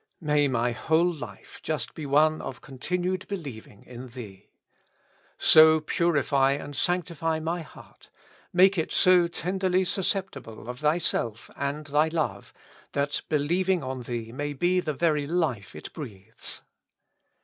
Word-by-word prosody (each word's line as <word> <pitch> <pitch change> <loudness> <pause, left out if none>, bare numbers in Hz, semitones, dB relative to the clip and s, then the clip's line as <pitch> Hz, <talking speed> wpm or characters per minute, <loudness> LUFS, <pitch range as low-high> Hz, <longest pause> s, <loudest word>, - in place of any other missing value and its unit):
May 150 -3 +2
my 120 -2 +1
whole 160 +10 +2
life 150 -2 -10
just 145 -7 -3
be 155 -3 -6
one 155 +3 +3
of 130 - -6
continued 180 +8 -3
believing 130 - -7
in 125 +1 -9
Thee. 115 -6 -11 0.9
So 155 0 +7
purify 145 -4 +2
and 145 0 -6
sanctify 165 -1 0
my 165 +2 -2
heart, 160 - -15 0.4
make 185 +1 +5
it 160 - -2
so 180 -2 +5
tenderly 185 +2 0
susceptible 175 - -2
of 125 0 -6
Thyself 150 -8 0
and 140 +2 -3
Thy 150 +2 +2
love, 150 -12 -2 0.4
that 140 +1 0
believing 175 +4 +1
on 130 -1 -4
Thee 115 -2 -5
may 145 +4 -3
be 175 +6 +2
the 160 -4 -2
very 150 -2 +1
life 145 - -1
it 75 - -9
breathes. 110 - -8
150 Hz, 135 wpm, -27 LUFS, 130-170 Hz, 0.9 s, So